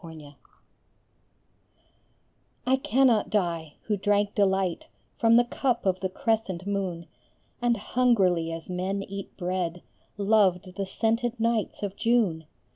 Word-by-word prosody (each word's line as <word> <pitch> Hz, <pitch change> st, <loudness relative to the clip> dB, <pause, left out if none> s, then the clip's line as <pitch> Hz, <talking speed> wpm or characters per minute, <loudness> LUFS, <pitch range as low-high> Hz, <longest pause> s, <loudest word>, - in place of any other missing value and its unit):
The 170 Hz, -, -10 dB
Wine 150 Hz, -3 st, -11 dB, 2.3 s
I 260 Hz, +1 st, +3 dB
cannot 255 Hz, -3 st, +3 dB
die, 170 Hz, -7 st, -1 dB
who 210 Hz, -, 0 dB
drank 205 Hz, +1 st, +1 dB
delight 190 Hz, -3 st, +1 dB, 0.3 s
From 230 Hz, 0 st, +5 dB
the 240 Hz, -, +6 dB
cup 245 Hz, 0 st, -1 dB
of 185 Hz, -1 st, +1 dB
the 190 Hz, -, -2 dB
crescent 195 Hz, -3 st, -1 dB
moon, 190 Hz, -4 st, -2 dB, 0.6 s
And 240 Hz, -1 st, +2 dB
hungrily 195 Hz, -8 st, +2 dB
as 165 Hz, 0 st, -6 dB
men 185 Hz, +2 st, -2 dB
eat 195 Hz, 0 st, -8 dB
bread, 180 Hz, -2 st, -2 dB, 0.3 s
Loved 195 Hz, -3 st, +2 dB
the 195 Hz, -1 st, -3 dB
scented 230 Hz, +3 st, -1 dB
nights 230 Hz, -2 st, -1 dB
of 200 Hz, -1 st, -3 dB
June. 215 Hz, -10 st, +1 dB
200 Hz, 125 wpm, -27 LUFS, 180-225 Hz, 2.3 s, the